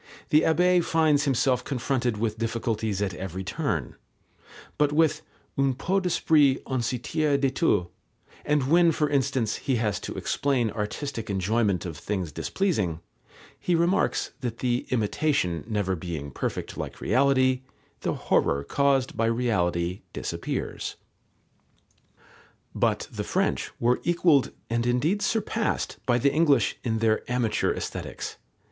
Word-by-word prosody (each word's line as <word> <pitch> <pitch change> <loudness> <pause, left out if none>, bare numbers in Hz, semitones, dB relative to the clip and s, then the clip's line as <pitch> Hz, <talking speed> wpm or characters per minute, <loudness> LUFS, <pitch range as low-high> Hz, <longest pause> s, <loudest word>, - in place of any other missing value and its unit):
The 150 - +5
Abbé 180 +2 +3
finds 155 -3 +3
himself 130 -2 +2
confronted 125 -3 -1
with 110 0 -2
difficulties 110 -3 -1
at 95 -2 -2
every 95 0 -5
turn, 100 +1 -2 0.8
but 150 -1 +3
with 155 0 +2 0.4
"un 135 -2 +2
peu 185 +9 0
d'esprit 155 -6 +3
on 130 -2 -1
se 120 +2 -1
tire 145 +4 0
de 135 -1 +1
tout," 135 - +2 0.6
and 145 -3 +1
when 170 0 +6
for 150 -1 +1
instance 135 -5 0
he 135 - -1
has 110 -3 0
to - - -6
explain 130 -6 0
artistic 115 +3 -4
enjoyment 100 0 +1
of 85 -3 -5
things 95 -6 -3
displeasing, 105 - -1 0.6
he 175 - +1
remarks 175 +4 +1
that 120 -4 -4
the 125 -1 -1
imitation 110 - 0
never 100 -4 0
being 80 -5 -5
perfect - - -4
like - - -6
reality, 130 -1 +3 0.4
the - - -1
horror 70 0 +1
caused 135 - +1
by 115 - +1
reality 90 -7 0
disappears. - - -4 1.8
But - - 0
the - - -4
French - - 0
were 120 +1 +2
equalled 170 -5 +3 0.2
and 115 +1 0
indeed 150 +12 +1
surpassed 220 +1 -1
by 120 -1 +4
the 140 +3 +2
English 145 -7 +3
in 115 -2 0
their 110 -1 +2
amateur 120 -4 +1
Aesthetics. - - -5
125 Hz, 135 wpm, -26 LUFS, 105-145 Hz, 1.8 s, when